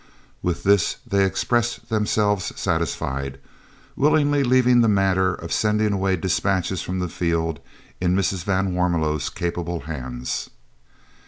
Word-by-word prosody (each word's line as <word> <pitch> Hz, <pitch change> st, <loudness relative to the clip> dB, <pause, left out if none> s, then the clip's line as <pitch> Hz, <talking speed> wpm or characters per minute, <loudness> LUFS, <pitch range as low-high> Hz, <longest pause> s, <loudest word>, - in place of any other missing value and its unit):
With 90 Hz, -2 st, -2 dB
this 100 Hz, -2 st, +3 dB
they 100 Hz, 0 st, +2 dB
expressed 120 Hz, +4 st, 0 dB
themselves 105 Hz, -3 st, 0 dB
satisfied, 70 Hz, -5 st, -2 dB, 0.6 s
willingly 145 Hz, 0 st, +3 dB
leaving 125 Hz, -1 st, +4 dB
the 115 Hz, -, +4 dB
matter 95 Hz, -3 st, +2 dB
of 85 Hz, -, -6 dB
sending 105 Hz, -1 st, +1 dB
away 95 Hz, -1 st, +1 dB
dispatches 95 Hz, 0 st, 0 dB
from 95 Hz, -, -4 dB
the 90 Hz, -1 st, -1 dB
field 85 Hz, -3 st, -1 dB, 0.4 s
in 90 Hz, 0 st, +1 dB
Mrs. 95 Hz, -2 st, 0 dB
van 95 Hz, -1 st, 0 dB
Warmelo's 80 Hz, -5 st, 0 dB
capable 85 Hz, -1 st, -3 dB
hands. 65 Hz, -5 st, -5 dB
95 Hz, 120 wpm, -23 LUFS, 85-105 Hz, 0.6 s, leaving